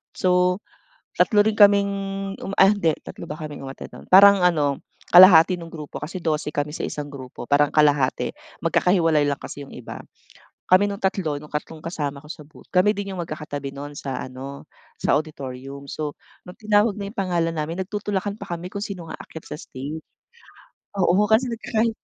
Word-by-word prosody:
So, 180 +1 +2 0.6
3 205 -2 +4
rin 220 0 0
kaming 200 -1 +6 0.5
uma 195 - -5
ah, 195 +1 +6
hindi 170 -7 +1
3 - - -9
ba 150 - -5
kaming 155 -3 -7
umattend 135 0 -9
nun, - - -12
parang 200 +1 +8
ano, 150 -6 +2 0.3
kalahati 180 -1 +8
nung 165 - -8
grupo 150 -3 -8
kasi 170 +4 -6
12 155 -1 0
kami 145 0 -3
sa - - -3
isang 145 -1 -6
grupo 130 -3 -9
parang 145 +3 +3
kalahati 145 -4 +2 0.3
magkakahiwalay 165 -5 +3
lang 140 - 0
kasi 145 - -8
yung 140 - -15
iba. 125 - -8 0.7
Kami 190 +3 +4
nung 200 - -4
tatlo, 180 -6 -1
nung 150 +1 -12
tatlong 155 +1 -5
kasama 145 -5 -4
ko 150 - -14
sa 155 - -8
booth, 150 +1 -16
kami 185 +4 +4
din 200 -1 -4
yung 180 - -4
magkakatabi 150 -3 -6
nun 145 +1 -8
sa 135 -2 -5
ano, 130 +2 -8 0.3
sa - - +1
auditorium. 140 -2 -7
So, 150 +1 -5 0.3
nung 180 - -11
tinawag 210 0 +2
na 200 - -4
yung - - -42
pangalan 170 -3 0
namin 165 +4 -3
nagtutulakan 205 -1 -3
pa 195 - -8
kami 175 +2 -8
kung 200 - -4
sinong 175 -5 -7
aakyat 160 - -10
sa - - -7
stage. 145 +5 -7 1.0
Oo, 195 +2 +3
kasi 230 +4 +3
nagkakahi 230 0 0
165 Hz, 180 wpm, -23 LUFS, 145-195 Hz, 1.0 s, parang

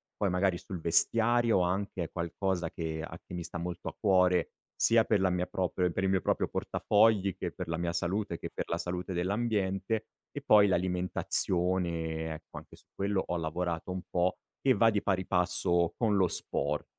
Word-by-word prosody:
poi 100 - 0
magari 90 0 +1
sul 90 -1 -7
vestiario 115 +6 +3
anche 90 0 -1
è - - -9
qualcosa 85 0 -2
che 80 -1 -4
a 80 +1 -8
che 90 - -9
mi 85 - -4
sta 85 +1 -6
molto 90 0 -4
a - - -12
cuore, 90 -3 +3 0.2
sia 115 -1 +4
per 105 - +2
la 95 0 +2
mia 90 0 0
proprio 90 0 -1
e 90 - +1
per 95 +3 -2
il 95 - +2
mio 95 -2 +2
proprio - - 0
portafogli, 105 -3 +2
che - - -3
per - - -6
la 85 0 -2
mia 85 -1 -2
salute, 95 +2 -1
e - - -6
che - - -5
per - - -4
la 85 - 0
salute 90 +2 -4
dell'ambiente, 100 +2 -1 0.2
e - - -6
poi 105 -1 +6
l'alimentazione, 90 -2 -1
ecco, - - -12
anche - - -11
su - - -23
quello 100 -1 -1
ho 90 - -2
lavorato 85 +1 -3
un 90 0 -3
po' 90 +1 +1 0.3
e 135 - +4
va 115 - +5
di 105 -2 0
pari 95 -1 0
passo 90 -1 +1
con 110 -4 +2
lo 95 -2 +4
sport. - - -1
90 Hz, 200 wpm, -30 LUFS, 85-100 Hz, 0.3 s, poi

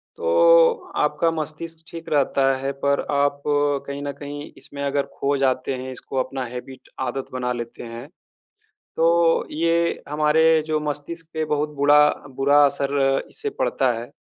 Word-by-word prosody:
तो 485 0 +4
आपका 165 - +1
मस्तिष्क 160 +1 -6
ठीक 165 -1 -9
रहता 135 -2 +2
है। 135 +1 -3
पर 140 0 +2
आप 140 0 +1
कहीं 145 -1 0
न 145 - -3
कहीं 145 0 -7
इसमें 140 0 -10
अगर 140 0 0
ख़ो 140 +1 +1
जाते 135 0 0
हैं, 130 +1 -6
इसको 130 +1 -7
अपना 130 -1 -5
हैबिट 125 +2 -9 0.2
आदत 135 -1 -5
बना 125 -1 -2
लेते 120 0 -7
हैं, 115 +3 -8 0.9
तो 165 0 +3
ये 170 +2 +1
हमारे 155 +2 +3
जो 155 -1 0
मस्तिष्क 150 +3 -5
पे 160 0 -1
बहुत 150 0 -1
बुडा 145 +1 +5 0.4
बुरा 145 +2 +5
असर 140 -1 0
इससे 440 -1 -5
पड़ता 130 -2 +1
है। 120 +1 -8
145 Hz, 150 wpm, -22 LUFS, 135-160 Hz, 0.9 s, बुडा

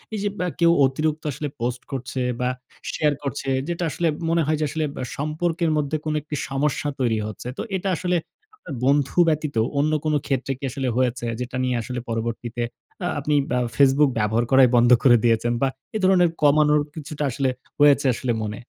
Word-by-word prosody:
এইযে 205 0 -1
বা 180 - 0
কেউ 170 0 +5
অতিরিক্ত 155 +3 -1
আসলে 145 +3 -4
পোস্ট 120 +1 -2
করছে 130 0 -4 0.2
বা, 125 - +1 0.4
শেয়ার 150 -1 +2
করছে 135 0 -4 0.2
যেটা 175 0 -2
আসলে 170 +2 -1 0.2
মনে 165 0 +2
হয় 155 0 +1
যে 155 - +1
আসলে 155 +1 -1
বা - - -5 0.2
সম্পর্কের 160 +3 -1
মধ্যে 150 +1 -1
কোন 155 - -1
একটি 150 0 -6
সমস্যা 140 +2 -1
তৈরি 115 -3 +1
হচ্ছে। 110 +3 -8
তো - - -3 0.2
এটা 190 +1 -2
আসলে 180 -1 0 0.4
আপনার 170 - -9
বন্ধু 140 +3 +2
ব্যতীত 150 -3 -1 0.2
অন্য 155 +2 +2
কোন 155 - +1
ক্ষেত্রে 135 0 -1
কি 140 - -17
আসলে 135 0 -3
হয়েছে? 125 -1 0
যেটা 125 +1 -5
নিয়ে 125 -1 0
আসলে 125 +1 -5
পরবর্তীতে 115 +1 -3 0.4
আ - - +1
আপনি 150 +1 -1 0.2
বা 125 - +2 0.2
facebook 140 +1 +5
ব্যবহার 110 +3 +1
করাই 130 -2 +7
বন্ধ 120 +1 +5
করে 120 -3 +7
দিয়েছেন? 115 0 +2
বা 135 - +3 0.3
এ - - +2
ধরনের 180 -2 +5
কমানোর 150 0 +4
কিছুটা 150 -1 -5
আসলে 135 +1 0 0.3
হয়েছে 145 -1 +5
আসলে 125 0 -2
মনে? 105 +2 -5
140 Hz, 185 wpm, -23 LUFS, 125-155 Hz, 0.4 s, করাই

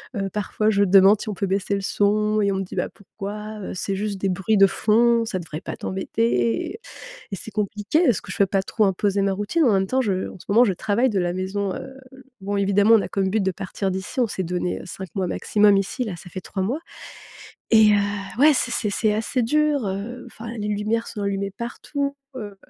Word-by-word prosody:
Heu, 195 -1 -2
parfois, 210 +1 0
je 200 -1 +3
demande 195 +2 +6
si - - -7
on - - -2
peut 195 - -2
baisser 195 +1 0
le 200 - -2
son 210 +2 +1
et 200 -1 +2
on - - -2
me 195 - -1
dit: 185 - -9
«Bah - - 0
pourquoi? 210 +2 -8
Heu, - - -5
c'est 195 +1 -2
juste 205 -1 -2
des 195 - 0
bruits 195 +4 0
de 195 - +8
fond, 230 +3 +3
ça 190 -5 -3
devrait 160 -2 -6
pas - - -6
t'embêter» 190 - -1 0.5
et - - -2
c'est 220 - -9
compliqué, 210 - 0
parce 225 -8 +3
que 190 - -7
je - - -7
peux 200 - +5
pas 195 0 0
trop 215 0 +1
imposer 195 +1 +1
ma 195 - +2
routine. 205 - 0
En 230 - +4
même 190 0 +2
temps, 260 +4 +1
je 195 -6 -1
en - - -12
ce - - -14
moment 230 +5 +6
je 195 - +2
travaille 220 +7 +1
de 195 -3 0
la 175 0 0
maison, 190 +1 -2
heu, 265 - -8 0.2
l 265 0 -14 0.2
bon 200 +1 -3
évidemment 200 +3 +4
on 205 - +2
a - - -5
comme 190 -1 0
but 220 +1 +1
de 190 0 0
partir 190 +1 -3
d'ici. 190 +7 -6
On 240 - +4
s'est 190 -2 -3
donné 180 +1 -2
5 190 -1 -7
mois 185 -3 -1
maximum 205 +1 +3
ici, 200 +6 -1
là, 190 -6 -5
ça 180 - -12
fait 185 - -6
3 190 +1 -4
mois 255 +11 -1 0.9
et 220 -2 +7
heu, 200 +2 -2
ouais, 305 +1 +7
c'est 250 - 0
c'est 210 -3 -1
c'est 210 +1 +1
assez 230 +3 -1
dur. 295 -1 +1
Heu, 210 +6 -5
enfin, 230 -1 -10
les 210 0 -3
lumières 215 +3 -1
sont 210 -3 -6
allumées 200 0 -1
partout. 280 +5 -4 0.2
Heu, 205 -4 -7
205 Hz, 240 wpm, -23 LUFS, 195-220 Hz, 0.9 s, de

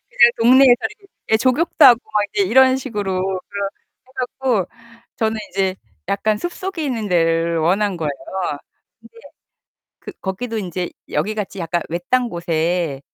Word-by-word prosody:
그냥 - - +6
동네에서 255 +2 +7 0.2
이렇게 395 -1 -22 0.2
예, 220 - +7
족욕도 295 +7 +2
하고 240 -1 +8
막 210 -1 +2
이제 200 - +1
이런 260 +4 +5
식으로 205 -8 -3
그걸 195 +1 -3 0.4
해 - - -21
갖고 250 -6 -1 0.5
저는 220 0 -1
인제 190 -1 -1 0.3
약간 210 +2 +1
숲속에 350 - -4
있는 230 -6 -2
데를 165 -1 +1
원한 190 +4 +1
거예요. 155 -3 -2 0.9
근데 - - -19 0.9
그 - - -9
거기도 220 +4 -4
인제 180 -2 -4 0.2
여기 215 +1 -1
같이 200 -2 -5
약간 170 0 -2
외딴 205 +10 0
곳에 170 -4 -1
205 Hz, 290 characters per minute, -20 LUFS, 180-255 Hz, 0.9 s, 하고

